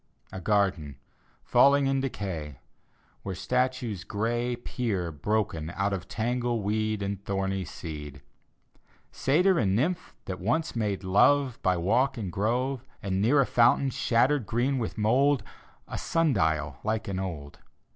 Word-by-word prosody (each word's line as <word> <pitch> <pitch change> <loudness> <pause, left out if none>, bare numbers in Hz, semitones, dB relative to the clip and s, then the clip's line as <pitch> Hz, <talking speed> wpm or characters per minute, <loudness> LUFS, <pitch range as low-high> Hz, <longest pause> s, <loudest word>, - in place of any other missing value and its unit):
A 95 - -6
garden, 95 -8 0 0.5
falling 140 0 +5
in 135 0 +1
decay, 90 - -4 0.6
Where 95 -1 -5
statues 125 0 -1
gray 120 +3 -1
Peer, 110 -8 -3
broken, 85 -1 -1
out 100 0 0
of 95 -1 -4
tangled 120 0 -1
weed 110 0 -1
And 100 0 -4
tiiomy 95 -1 -2
seed; 75 -4 -8 0.9
Satyr 180 +7 +3
and 95 -4 +2
Nymph, 170 - -1
that 95 -1 -5
once 125 - -1
made 105 -4 -1
love 125 +7 +3
By 95 -1 +2
walk 115 +11 +1
and 100 -6 -4
grove: 125 +6 -1 0.2
And, 95 -1 -1
near 135 +7 +4
a - - +2
fountain, 125 +3 +3
shattered, 125 +1 +2
green 130 +4 0
with 115 - -4
mould, 125 +4 +3 0.4
A - - -5
sundial, 100 - +1
lichen 105 -3 -2
old. 80 -7 -6
110 Hz, 135 wpm, -28 LUFS, 95-125 Hz, 0.9 s, falling